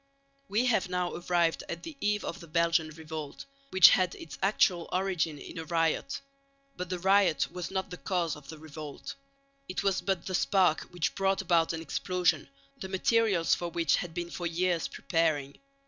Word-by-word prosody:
We 220 Hz, +5 st, +2 dB
have 220 Hz, -7 st, +2 dB
now 180 Hz, -1 st, -1 dB
arrived 175 Hz, -1 st, +1 dB
at 170 Hz, +1 st, -5 dB
the 310 Hz, -, -7 dB
eve 210 Hz, 0 st, 0 dB
of -, -, -5 dB
the 170 Hz, -, -11 dB
Belgian 165 Hz, 0 st, +2 dB
Revolt, 155 Hz, -2 st, -7 dB, 0.2 s
which 190 Hz, -5 st, +9 dB
had 185 Hz, -2 st, +2 dB
its 165 Hz, -, -9 dB
actual 185 Hz, -3 st, +2 dB
origin 180 Hz, -5 st, 0 dB
in 155 Hz, -, -8 dB
a -, -, -4 dB
riot. 165 Hz, -, 0 dB, 0.5 s
But 180 Hz, -1 st, -5 dB
the 185 Hz, -, -2 dB
riot 190 Hz, -2 st, +3 dB
was 180 Hz, -2 st, -5 dB
not 190 Hz, 0 st, -3 dB
the 180 Hz, -, -6 dB
cause 175 Hz, -5 st, -1 dB
of 150 Hz, -2 st, -14 dB
the 160 Hz, -, -8 dB
revolt; 150 Hz, -1 st, -8 dB, 0.6 s
it 185 Hz, -, -2 dB
was 195 Hz, -2 st, +1 dB
but 190 Hz, -3 st, -1 dB
the 190 Hz, -, -4 dB
spark 185 Hz, -3 st, +3 dB
which 175 Hz, -3 st, -1 dB
brought 195 Hz, 0 st, +1 dB
about 170 Hz, -3 st, +3 dB
an 165 Hz, -1 st, -4 dB
explosion, 175 Hz, -4 st, 0 dB, 0.3 s
the 190 Hz, -, -6 dB
materials 195 Hz, -2 st, +2 dB
for 175 Hz, -, -1 dB
which 165 Hz, -1 st, +2 dB
had 170 Hz, -2 st, -5 dB
been 175 Hz, -1 st, -4 dB
for 175 Hz, -, -3 dB
years 170 Hz, 0 st, 0 dB
preparing. 155 Hz, -5 st, -1 dB
175 Hz, 180 wpm, -29 LUFS, 165-190 Hz, 0.6 s, which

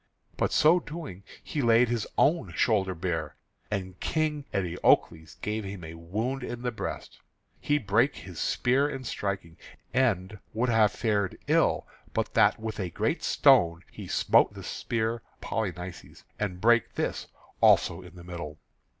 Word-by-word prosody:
But -, -, 0 dB
so 165 Hz, +4 st, +5 dB
doing 150 Hz, -, -8 dB, 0.2 s
he 150 Hz, -, -3 dB
laid 120 Hz, 0 st, +5 dB
his 115 Hz, -2 st, -1 dB
own 165 Hz, +3 st, +2 dB
shoulder 95 Hz, -5 st, +1 dB
bare, 80 Hz, -3 st, -3 dB, 0.3 s
and 95 Hz, -3 st, -4 dB
King 155 Hz, -2 st, -1 dB
Eteocles 85 Hz, -3 st, +1 dB
gave 105 Hz, +1 st, -2 dB
him 95 Hz, -2 st, -7 dB
a 80 Hz, 0 st, -7 dB
wound 110 Hz, +11 st, -3 dB
in 120 Hz, -1 st, -5 dB
the 125 Hz, -, 0 dB
breast. 110 Hz, -, -6 dB, 0.4 s
He 150 Hz, -, +1 dB
brake 115 Hz, +2 st, +2 dB
his 85 Hz, 0 st, -9 dB
spear 135 Hz, +4 st, +2 dB
in 135 Hz, -2 st, -5 dB
striking, 95 Hz, -7 st, -4 dB, 0.4 s
and 105 Hz, -6 st, +1 dB, 0.2 s
would 120 Hz, +3 st, +1 dB
have 110 Hz, -3 st, +4 dB
fared 105 Hz, -4 st, -1 dB
ill -, -, +2 dB, 0.3 s
but -, -, -1 dB
that -, -, +4 dB
with 110 Hz, -1 st, -5 dB
a 95 Hz, -3 st, -2 dB
great -, -, -1 dB
stone 85 Hz, 0 st, +4 dB
he -, -, -9 dB
smote -, -, +3 dB
the -, -, -8 dB
spear 115 Hz, 0 st, -2 dB
of -, -, -18 dB, 0.2 s
Polynices, 90 Hz, -4 st, -5 dB, 0.2 s
and 90 Hz, -4 st, -2 dB
brake 120 Hz, +2 st, +3 dB
this -, -, -2 dB, 0.3 s
also 85 Hz, +2 st, +4 dB
in 90 Hz, 0 st, -13 dB
the 85 Hz, -, -11 dB
middle. 85 Hz, -4 st, -7 dB
105 Hz, 155 wpm, -28 LUFS, 90-120 Hz, 0.4 s, so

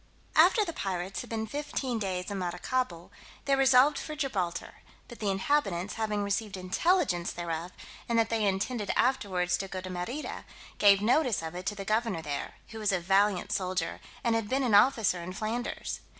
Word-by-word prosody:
After 430 Hz, -3 st, +6 dB
the 335 Hz, -, -4 dB
pirates 190 Hz, -, -3 dB
had 245 Hz, -, -10 dB
been 220 Hz, -1 st, -2 dB
fifteen 265 Hz, -1 st, -3 dB
days 185 Hz, -1 st, -3 dB
in 200 Hz, -, -3 dB
Maracaibo, 180 Hz, +1 st, -2 dB, 0.3 s
they 275 Hz, 0 st, +3 dB
resolved 270 Hz, +1 st, +5 dB
for 305 Hz, -, -6 dB
Gibraltar; 195 Hz, -, -3 dB, 0.3 s
but 240 Hz, -, -11 dB
the 210 Hz, -, 0 dB
inhabitants 195 Hz, -3 st, 0 dB
having 210 Hz, -2 st, -1 dB
received 200 Hz, 0 st, -2 dB
intelligence 185 Hz, -, +1 dB
thereof, 170 Hz, 0 st, -4 dB, 0.4 s
and 235 Hz, -, +2 dB
that 225 Hz, 0 st, +2 dB
they 220 Hz, -2 st, +2 dB
intended 200 Hz, +3 st, -1 dB
afterwards 185 Hz, -8 st, +1 dB
to 195 Hz, -, -4 dB
go 190 Hz, 0 st, -5 dB
to 185 Hz, 0 st, -7 dB
Merida, 185 Hz, +12 st, -5 dB, 0.3 s
gave 200 Hz, -1 st, +6 dB
notice 245 Hz, -, +2 dB
of 160 Hz, 0 st, -5 dB
it 180 Hz, +1 st, -6 dB
to 210 Hz, -, -1 dB
the 195 Hz, -1 st, -6 dB
governor 215 Hz, -5 st, 0 dB
there, 145 Hz, -2 st, -4 dB
who 225 Hz, -, -8 dB
was 210 Hz, -1 st, +1 dB
a 185 Hz, -, +1 dB
valiant 195 Hz, +2 st, +2 dB
soldier, 185 Hz, -3 st, -1 dB, 0.2 s
and 235 Hz, -, +2 dB
had 225 Hz, -2 st, -1 dB
been 270 Hz, +1 st, +1 dB
an 240 Hz, -4 st, +1 dB
officer 205 Hz, -4 st, +4 dB
in 180 Hz, +2 st, -6 dB
Flanders. 220 Hz, +4 st, -3 dB
205 Hz, 180 wpm, -29 LUFS, 185-240 Hz, 0.4 s, After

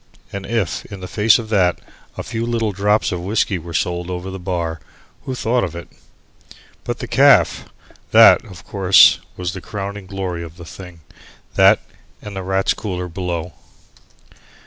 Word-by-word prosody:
And 100 Hz, -1 st, -6 dB
if, 115 Hz, -8 st, -1 dB
in 100 Hz, -, -9 dB
the 90 Hz, -, -7 dB
face 105 Hz, +4 st, +4 dB
of 115 Hz, -3 st, -7 dB
that, 95 Hz, -5 st, +2 dB, 0.4 s
a -, -, -4 dB
few 115 Hz, -1 st, -4 dB
little 115 Hz, -2 st, -1 dB
drops 105 Hz, +2 st, +1 dB
of 90 Hz, -, -3 dB
whiskey 100 Hz, 0 st, 0 dB
were 85 Hz, +1 st, -10 dB
sold 85 Hz, +2 st, -1 dB
over 90 Hz, +1 st, -5 dB
the 95 Hz, -, -7 dB
bar, 85 Hz, -3 st, -3 dB, 0.5 s
who 130 Hz, -, -4 dB
thought 120 Hz, 0 st, 0 dB
of 85 Hz, -3 st, -4 dB
it? 85 Hz, -, -8 dB, 0.9 s
But -, -, -3 dB
the -, -, -6 dB
caff! -, -, +4 dB, 0.4 s
that, -, -, +7 dB
of 90 Hz, -3 st, -12 dB
course, 95 Hz, 0 st, +5 dB, 0.2 s
was 90 Hz, -1 st, -3 dB
the 95 Hz, -, -7 dB
crowning 100 Hz, -1 st, -6 dB
glory 95 Hz, -3 st, -4 dB
of 85 Hz, 0 st, -10 dB
the 85 Hz, -, -10 dB
thing, 90 Hz, -1 st, -11 dB, 0.5 s
that -, -, +5 dB, 0.4 s
and 105 Hz, -1 st, -9 dB
the 95 Hz, -, -4 dB
Rats' 95 Hz, +1 st, 0 dB
Cooler 90 Hz, -4 st, -5 dB
below. 90 Hz, -1 st, -4 dB
95 Hz, 170 wpm, -19 LUFS, 90-105 Hz, 0.9 s, that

